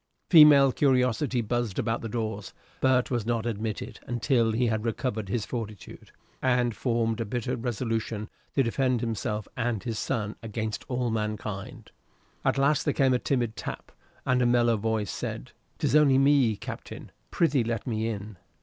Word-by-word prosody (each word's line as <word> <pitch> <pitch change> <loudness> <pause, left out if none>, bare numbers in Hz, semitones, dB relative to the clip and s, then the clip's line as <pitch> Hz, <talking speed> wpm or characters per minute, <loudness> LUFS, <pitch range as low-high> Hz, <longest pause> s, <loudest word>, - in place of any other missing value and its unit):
Female 150 -5 +8
curiosity 125 -1 +2
buzzed 115 -2 -2
about 115 +1 -1
the 115 - -5
doors, 110 -3 -4 0.2
but 130 -1 +2
was 120 -3 0
not 115 0 -1
admitted 115 +2 -4
until 120 -1 +1
he 120 +3 +1
had 110 -2 0
recovered 110 -3 -2
his 110 +1 -1
fortitude, 110 -5 -7 0.3
and 125 -3 +2
formed 115 -2 0
a - - +1
bitter 120 +3 -2
resolution 115 -2 -3 0.3
to 135 - +4
defend 125 0 0
himself 110 -2 -3
and 115 -4 -1
his 115 -2 -3
son 110 -4 -2
against 110 -1 -4
all 125 -2 -1
mankind. 105 -2 -4 0.5
At - - +1
last 140 +1 +3
there - - 0
came 135 -2 +3
a 125 - +2
timid 120 -5 -1
tap, - - -7 0.3
and 125 0 +2
a 120 - +3
mellow 120 -1 +3
voice 110 -1 -1
said, - - -5 0.2
"It - - -16
is - - +2
only 145 -3 +6
me, 135 -5 +4
Captain. - - -8 0.2
Prithee 150 -7 +2
let 115 -2 -3
me 110 -2 -1
in." 105 -2 -5
115 Hz, 165 wpm, -27 LUFS, 110-125 Hz, 0.5 s, Female